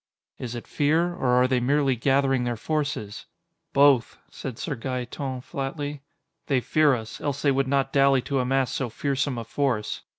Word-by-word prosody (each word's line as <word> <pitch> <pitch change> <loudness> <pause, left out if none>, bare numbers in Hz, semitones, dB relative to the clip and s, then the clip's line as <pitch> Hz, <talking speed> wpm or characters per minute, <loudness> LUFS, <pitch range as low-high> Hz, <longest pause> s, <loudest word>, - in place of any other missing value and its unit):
"Is 125 -1 -5
it 120 - -6
fear, 160 +4 +1
or 175 -7 -2
are 125 +1 +4
they 130 -1 +1
merely 135 +1 +2
gathering 135 +1 +2
their 120 -1 -1
forces?" 140 -6 -3 0.4
"Both," 140 -4 +4
said 130 -4 -7
Sir 150 - -3
Gaeton 130 +1 -4
flatly. 145 +2 -4 0.5
"They 135 -3 +2
fear 150 +2 +3
us, 110 -2 -7
else 140 -2 -3
they 140 - +4
would 135 0 +1
not 135 0 0
dally 135 -2 +4
to 140 -2 -1
amass 130 0 +1
so 130 -3 -2
fearsome 140 +2 -1
a 115 - -3
force. 120 -4 -1
135 Hz, 170 wpm, -25 LUFS, 125-140 Hz, 0.5 s, are